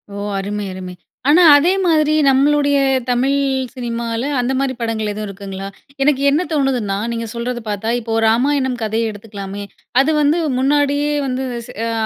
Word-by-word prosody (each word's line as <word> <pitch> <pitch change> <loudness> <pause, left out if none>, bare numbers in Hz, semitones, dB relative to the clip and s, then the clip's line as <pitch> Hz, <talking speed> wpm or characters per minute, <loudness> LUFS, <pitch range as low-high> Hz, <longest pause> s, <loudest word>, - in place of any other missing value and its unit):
ஓ - - -6 0.2
அருமை, 205 +1 -4
அருமை! 185 -1 -7 0.4
ஆனா 345 +4 +6
அதே 315 +5 +4
மாதிரி 310 -3 +3
நம்மளுடைய 285 +1 +3 0.3
தமிழ் 255 +3 +2 0.4
சினிமால, 235 -2 -3 0.2
அந்த 245 +1 0
மாரி 270 -1 0
படங்கள் 220 -2 -2
எதுவும் 210 0 -5
இருக்குங்களா? 195 -1 -7 0.4
எனக்கு 275 -1 +2
என்ன 300 +5 +2
தோணுதுன்னா, 255 -9 0
நீங்க 230 0 -3
சொல்றது 240 +1 -3
பார்த்தா, 210 +2 -2
இப்போ 225 -1 -5 0.2
ராமாயணம் 260 +1 +1
கதைய 220 +1 -1
எடுத்துக்கலாமே, 205 -1 -8 0.4
அது 290 +4 +1
வந்து, 295 +3 +3 0.2
முன்னாடியே 290 +2 +1 0.2
வந்து 260 +1 -2
எச 235 - -10 0.2
அ 230 - -2
245 Hz, 150 wpm, -18 LUFS, 215-285 Hz, 0.4 s, ஆனா